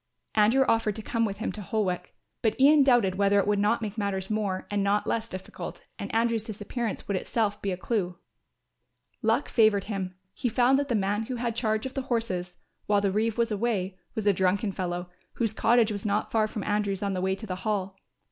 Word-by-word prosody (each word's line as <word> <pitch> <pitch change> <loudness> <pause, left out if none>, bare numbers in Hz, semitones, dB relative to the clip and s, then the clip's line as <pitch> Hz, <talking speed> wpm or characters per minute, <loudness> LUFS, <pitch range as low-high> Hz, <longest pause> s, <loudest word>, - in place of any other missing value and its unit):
Andrew 225 +5 +4
offered 225 -2 +2
to 220 - -6
come 230 0 0
with 200 -2 -3
him 220 - -2
to 210 - -7
Holwick, 195 -3 -2 0.3
but 220 +1 0
Ian 290 +2 +7
doubted 240 -8 +3
whether 200 0 +4
it 200 - +3
would 205 0 +2
not 220 +3 +2
make 215 +1 -4
matters 195 -1 -2
more 205 -3 -1
and 205 -1 +1
not 205 +1 +2
less 225 0 -1
difficult 185 0 -7
and - - -5
Andrew's 230 0 +2
disappearance 220 +1 -4
would 200 - 0
itself 205 +2 -1
give 190 -2 -2
a - - -23
clue. 185 -7 -1 1.0
Luck - - +2
favoured 215 -4 +4
him, 195 -3 -4 0.2
he 245 - -1
found 250 +3 +4
that 285 - -1
the 240 - 0
man 205 +2 0
who 255 - -3
had 235 -1 -2
charge 220 -1 0
of 265 - -4
the 270 - -2
horses, 185 -7 -2 0.3
while 205 -1 +4
the 200 -1 +1
reeve 215 +3 0
was 235 -1 +1
away, 200 -3 -1 0.2
was 220 -2 -2
a 205 - +5
drunken 190 +3 +1
fellow, 175 -1 -3 0.3
whose 225 -3 -1
cottage 230 0 +3
was 205 -2 -4
not 210 0 0
far 220 -1 +2
from 215 -2 -5
Andrew's 205 -2 0
on 200 -1 0
the 185 - -2
way 190 +1 +1
to 220 - -8
the 185 -3 -4
Hall. 195 -2 -2
210 Hz, 215 wpm, -27 LUFS, 195-230 Hz, 1.0 s, Ian